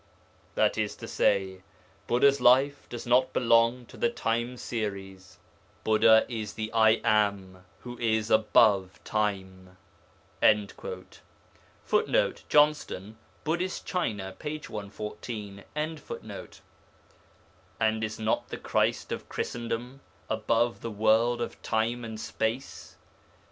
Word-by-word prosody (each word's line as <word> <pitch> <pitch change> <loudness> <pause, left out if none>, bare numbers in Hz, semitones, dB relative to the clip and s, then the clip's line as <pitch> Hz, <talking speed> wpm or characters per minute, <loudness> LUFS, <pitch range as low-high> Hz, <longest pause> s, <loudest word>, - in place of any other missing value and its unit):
'That - - +2
is - - -1
to - - -9
say, 95 -2 +1 0.5
Buddha's 140 +2 +3
life 135 +3 +4
does 120 - -6
not 125 +2 +3
belong 115 +1 +3
to - - -15
the 235 - +2
time 120 - -2
series: 100 -5 -5 0.5
Buddha 110 +1 +5
is 110 -4 -5
the 110 0 -4
"I 110 0 +4
Am" 100 -4 +1 0.2
who 120 0 -9
is 110 -1 0
above 105 -3 +4
time.' 95 -3 -3 0.6
[Footnote: 105 -2 0 1.3
Johnston, 145 -8 +2 0.2
Buddhist 175 +4 -2
China, 105 - -2
p. 150 +1 -4
114.] 105 -3 -7 2.2
And 110 0 +1
is 110 0 -4
not 110 0 -1
the - - -5
Christ - - 0
of - - -5
Christendom 120 +3 -4 0.3
above 115 +2 +1
the 115 - -4
world 110 +3 +2
of - - -8
time 115 +2 -1
and 110 -1 -6
space? 115 +5 -4
110 Hz, 105 wpm, -28 LUFS, 105-120 Hz, 2.2 s, Buddha